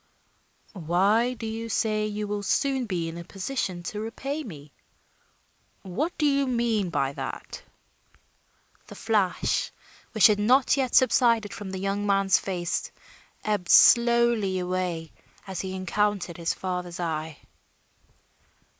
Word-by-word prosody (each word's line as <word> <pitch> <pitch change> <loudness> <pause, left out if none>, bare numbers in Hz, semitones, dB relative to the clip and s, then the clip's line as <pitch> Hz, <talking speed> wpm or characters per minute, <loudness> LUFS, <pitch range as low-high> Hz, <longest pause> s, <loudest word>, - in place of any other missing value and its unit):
"Why 210 +8 +2
do 230 - -7
you 225 +1 -5
say 215 -1 0
you 210 0 -4
will 205 0 -3
soon 265 +4 0
be 175 -4 -2
in 165 +1 -6
a - - -7
position 185 -1 -4
to 210 +4 -5
repay 275 +7 -4
me? 150 - -11 1.1
What 270 - -3
do 300 - +1
you 280 -1 +2
mean 235 -6 0
by 140 -4 -1
that?" - - -7 1.3
The - - -11
flash, 205 -5 0 0.4
which 215 -4 +5
had 210 -2 +5
not 250 +6 +4
yet 265 -3 -1
subsided 230 -5 +3
from 205 -2 -7
the 190 - -5
young 195 +2 -2
man's 195 -1 +3
face, 175 -3 -3 0.5
ebbed 205 -5 -2
slowly 235 -5 +5
away 180 -3 -3 0.3
as 190 -2 -4
he 190 -1 -5
encountered 190 -1 -1
his 170 -1 -2
father's 180 -2 -4
eye. 160 -3 -3
205 Hz, 130 wpm, -26 LUFS, 180-230 Hz, 1.3 s, which